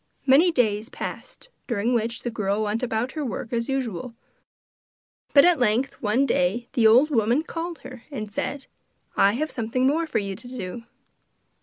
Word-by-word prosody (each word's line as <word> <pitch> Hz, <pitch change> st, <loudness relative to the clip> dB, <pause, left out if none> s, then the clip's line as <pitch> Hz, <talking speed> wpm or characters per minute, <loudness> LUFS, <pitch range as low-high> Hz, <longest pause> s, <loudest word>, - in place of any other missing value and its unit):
Many 290 Hz, +7 st, +6 dB
days 220 Hz, -5 st, 0 dB
passed -, -, -8 dB, 0.2 s
during 235 Hz, 0 st, 0 dB
which 230 Hz, +1 st, -1 dB
the 240 Hz, -, -2 dB
girl 210 Hz, -1 st, -1 dB
went 215 Hz, +2 st, -1 dB
about 240 Hz, 0 st, -1 dB
her 305 Hz, 0 st, -4 dB
work 230 Hz, -1 st, -5 dB
as 230 Hz, +1 st, -1 dB
usual, 250 Hz, -3 st, -3 dB, 1.2 s
but 280 Hz, +1 st, +7 dB
at 350 Hz, -4 st, +4 dB
length 245 Hz, +3 st, +1 dB
one 230 Hz, +5 st, +2 dB
day 230 Hz, +1 st, 0 dB
the 225 Hz, -3 st, +5 dB
old 255 Hz, +8 st, +5 dB
woman 235 Hz, +4 st, +2 dB
called 335 Hz, 0 st, -5 dB
her 255 Hz, -2 st, -10 dB
and 215 Hz, -7 st, -6 dB
said: 275 Hz, +6 st, -3 dB, 0.5 s
'I 200 Hz, +1 st, +4 dB
have 300 Hz, +5 st, -2 dB
something 240 Hz, +2 st, -1 dB
more 320 Hz, +5 st, +2 dB
for -, -, -1 dB
you 195 Hz, -2 st, -2 dB
to 240 Hz, +5 st, -12 dB
do. 235 Hz, -2 st, -6 dB
240 Hz, 170 wpm, -24 LUFS, 220-275 Hz, 1.2 s, but